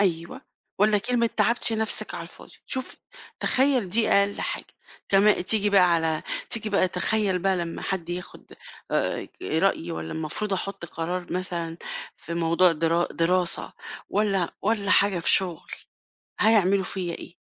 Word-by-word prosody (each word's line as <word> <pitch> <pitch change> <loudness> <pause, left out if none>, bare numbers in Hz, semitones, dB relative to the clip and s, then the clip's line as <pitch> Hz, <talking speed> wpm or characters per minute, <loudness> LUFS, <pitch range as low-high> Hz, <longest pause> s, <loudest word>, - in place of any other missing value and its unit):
أيوه، 185 +6 -1 0.4
والّا 210 +1 +4
كلمة 235 +3 0
تعبتِ 235 -1 +2
نَفْسِك 220 0 -1
على - - -5
الفاضي. - - -13
شوف، 260 -1 -4 0.4
تخيّل 260 -6 +2
دي 220 +5 +3
أقل 200 0 +2
حاجة. - - -4 0.4
كما 200 +2 +5
تيجي 205 +2 +3
بقى 180 -3 +5
على 160 -1 0 0.3
تيجي 220 -2 +1
بقى 195 -2 +3
تخيّل 195 +1 +1
بقى 190 +1 +1
لمّا 170 -1 -4
حد 180 -4 -3
ياخُد 180 +1 -7 0.4
آآ - - -1
رأيي 85 +1 0
والّا 80 0 -5
المفروض 160 +7 -3
أحُط 195 -2 -4
قرار 175 +2 -5
مثلًا 170 -2 -2 0.4
في 170 - -7
موضوع 170 +1 +3
درا 165 +2 +1
دراسة 175 +1 +1 0.4
والّا 195 -4 0
والّا 205 -1 0
حاجة 200 -3 +4
في 170 - +1
شُغل، 180 -4 +1 0.7
هيعملوا 200 -3 +4
فيّا 180 -2 -4
إيه؟ - - -9
185 Hz, 145 wpm, -25 LUFS, 170-210 Hz, 0.7 s, كما